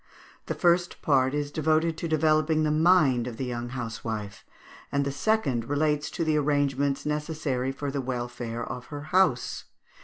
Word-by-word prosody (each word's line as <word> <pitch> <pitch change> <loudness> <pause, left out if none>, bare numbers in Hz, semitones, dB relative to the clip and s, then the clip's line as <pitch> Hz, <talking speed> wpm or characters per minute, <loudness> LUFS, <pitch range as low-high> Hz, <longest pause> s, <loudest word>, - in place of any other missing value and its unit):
The - - -2
first 175 0 +1
part 135 -2 +3
is 145 -1 -2
devoted 160 +2 +1
to 170 - -2
developing 155 0 +2
the 155 - +1
mind 155 -7 +4
of 120 -2 -6
the 130 - -3
young 120 -1 -4
housewife; 115 -4 -5 0.5
and 140 0 +1
the 140 - -1
second 140 - 0
relates 150 0 +1
to 170 - -3
the 155 -1 +2
arrangements 140 -1 +1
necessary 150 -4 -2
for 140 +1 -4
the 140 0 -2
welfare 120 -2 -4
of 125 -1 -6
her 145 -1 -6
house. 185 -10 +2
145 Hz, 160 wpm, -27 LUFS, 125-155 Hz, 0.5 s, mind